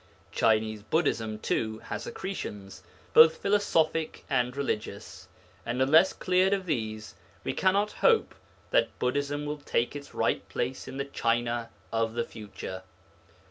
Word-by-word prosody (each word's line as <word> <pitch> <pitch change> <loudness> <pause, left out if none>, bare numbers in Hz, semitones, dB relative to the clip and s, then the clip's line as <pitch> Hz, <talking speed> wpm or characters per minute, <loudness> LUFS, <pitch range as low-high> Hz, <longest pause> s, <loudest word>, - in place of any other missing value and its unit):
Chinese 110 -1 +2
Buddhism, 110 -4 0
too, 110 0 -1
has 110 -1 -6
accretions, 105 - -6 0.3
both 160 0 +8
philosophic 165 -6 +1
and 125 0 +1
religious, 105 -7 -4 0.4
and 120 +2 -3
unless 155 +8 +6
cleared 185 +1 +2
of 195 -2 -1
these, 110 - -3 0.3
we - - -2
cannot 200 +3 +2
hope 460 -2 +3 0.4
that - - +2
Buddhism 145 +3 -1
will 150 0 -4
take 120 -2 -1
its 140 -1 -9
right - - 0
place 130 +2 -3
in 135 - -7
the 140 - -2
China 120 -3 -1 0.2
of 115 0 0
the 120 - +1
future. 100 -3 -8
130 Hz, 135 wpm, -28 LUFS, 110-160 Hz, 0.4 s, both